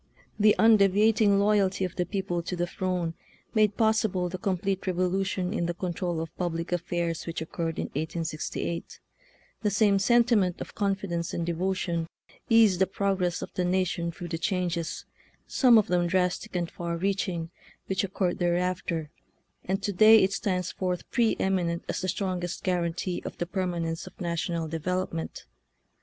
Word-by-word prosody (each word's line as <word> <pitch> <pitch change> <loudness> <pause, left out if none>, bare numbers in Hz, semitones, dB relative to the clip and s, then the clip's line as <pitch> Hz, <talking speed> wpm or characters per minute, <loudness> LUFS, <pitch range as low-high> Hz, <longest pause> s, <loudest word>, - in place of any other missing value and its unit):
The 210 0 +6
undevi 205 -3 +5
ating 205 -2 +3
loyalty 200 -2 +2
of 180 - -6
the 180 - -1
people 190 -4 -2
to 175 +2 -4
the 175 0 0
throne 180 -2 -2 0.4
made 215 -3 +3
possible 220 -5 +2
the 185 +1 -5
complete 195 +1 -1
revolution 185 0 0
in 170 - -1
the 175 - -2
control 175 -1 -2
of 165 0 -6
public 170 -1 -2
affairs 175 -1 -2
which 165 - -3
oc 160 - -6
curred 165 -1 -2
in - - -1
1868; 160 +2 -4 0.6
the 210 - +2
same 200 0 +3
sentiment 230 -4 +3
of - - -7
con 200 -1 +1
fidence 175 -4 -4
and 170 - -1
devotion 170 -1 -1 0.4
eased 225 -6 +5
the 190 - +5
progress 190 -3 -1
of - - -8
the 180 - -1
nation 180 -2 0
through 175 +1 -8
the 165 -1 -3
changes, 175 -2 -2 0.4
some 245 -4 +5
of 215 - +4
them 175 0 +1
drastic 180 +3 0
and 175 -1 -1
far 170 -1 -3
reaching, 185 -3 -1 0.3
which 190 0 -1
oc 195 - -4
curred 180 -3 0
thereafter, 175 -3 -1 0.5
and 195 +2 -1
to 205 - -1
day 215 +3 +7
it 190 +1 +1
stands 185 -2 -1
forth 180 -1 -3
pre 235 -3 +2
eminent 175 -3 0
as - - -2
the 185 - -2
strongest 180 -2 -2
guar 180 -3 +1
antee 175 +2 -3
of - - -7
the 175 - -2
permanence 170 -3 -2
of - - -13
national 170 -1 -2
de 160 +1 -4
velopment. 180 -1 -3
180 Hz, 170 wpm, -27 LUFS, 170-195 Hz, 0.6 s, day